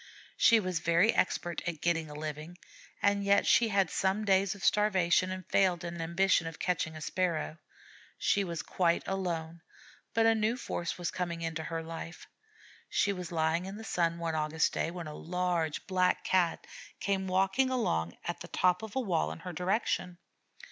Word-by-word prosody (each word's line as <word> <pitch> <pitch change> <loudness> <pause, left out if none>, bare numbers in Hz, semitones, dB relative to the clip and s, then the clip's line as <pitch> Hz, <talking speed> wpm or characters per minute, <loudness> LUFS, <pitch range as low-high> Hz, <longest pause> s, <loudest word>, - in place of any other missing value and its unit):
She 230 -1 +6
was 185 -4 -2
very 170 +6 +3
expert 175 -1 0
at 170 -3 -3
getting 165 -2 0
a 150 - -9
living, 155 +3 -6 0.5
and 200 0 +3
yet 200 0 +4
she 235 - +5
had 195 -4 +1
some 195 +3 0
days 195 0 +3
of 200 - -6
starvation 185 -4 +3
and 185 -1 -5
failed 185 -3 +2
in 170 0 -5
her - - -4
ambition 170 +1 +2
of 165 - -7
catching 165 -3 -1
a 155 - -8
Sparrow. 170 -1 -1 0.6
She 200 - +2
was 170 -4 -4
quite 170 -2 +1
alone, 170 -3 -3 0.5
but 225 0 +4
a 225 - +6
new 220 +2 0
force 170 -8 -4
was 175 -1 -3
coming 170 -2 -3
into 165 -1 -3
her 165 -1 -3
life. 165 +1 -8 0.6
She 200 - +2
was 180 -3 -6
lying 165 +2 0
in 195 +2 -7
the 220 - -8
sun 170 -5 0
one 165 -1 -2
August 155 +1 +1
day, - - -1
when 170 -1 -6
a 150 - -7
large 175 -2 -2
Black 185 -1 +1
Cat 180 -3 +1 0.3
came 195 -1 -1
walking 195 +8 +2
along 85 - -1 0.2
the 175 - -7
top 180 0 +2
of 220 +1 -8
a - - +2
wall 185 -10 0
in - - -8
her 180 0 -6
direction. 180 0 -1
180 Hz, 180 wpm, -31 LUFS, 165-195 Hz, 0.6 s, She